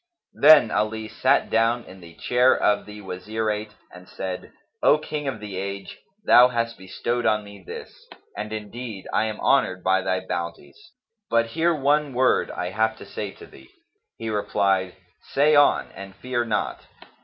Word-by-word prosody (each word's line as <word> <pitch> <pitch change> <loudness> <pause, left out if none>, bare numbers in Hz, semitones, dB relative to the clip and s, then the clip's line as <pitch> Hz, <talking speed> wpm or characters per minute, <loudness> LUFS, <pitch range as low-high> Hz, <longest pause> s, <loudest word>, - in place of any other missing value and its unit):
Then 150 -6 +7
Ali 110 +1 -1
sat - - +1
down 115 +1 +2
in 95 +1 -13
the 85 -2 -14
chair 125 +7 +3
of 105 0 +1
the 105 0 -10
Wazirate 105 +3 -4 0.2
and 90 0 -14
said, 95 -1 -6 0.3
"O 150 - +5
King 150 -1 -5
of 130 -5 -3
the 105 -3 -7
age, 100 +1 -6 0.3
thou 125 +1 +8
hast 115 -2 -2
bestowed 120 +6 -2
on 105 -1 +2
me 100 -2 -13
this; - - -10 0.3
and 105 0 -5
indeed 110 0 -7
I 110 - +2
am 110 -1 -4
honoured 95 -10 +2
by 95 0 +2
thy 95 0 -1
bounties; 85 - -6 0.4
but 115 0 +2
hear 165 +1 +2
one 145 -1 +1
word 130 +1 +2
I 90 0 -4
have 110 +2 0
to - - -11
say 100 +1 -5
to - - -13
thee!" 65 -1 -17 0.5
He 115 -1 -4
replied, 95 -3 0 0.4
"Say 150 +2 +4
on, 145 0 +4
and 95 0 -10
fear 120 +3 -2
not." 105 -2 -2
110 Hz, 165 wpm, -24 LUFS, 95-120 Hz, 0.5 s, thou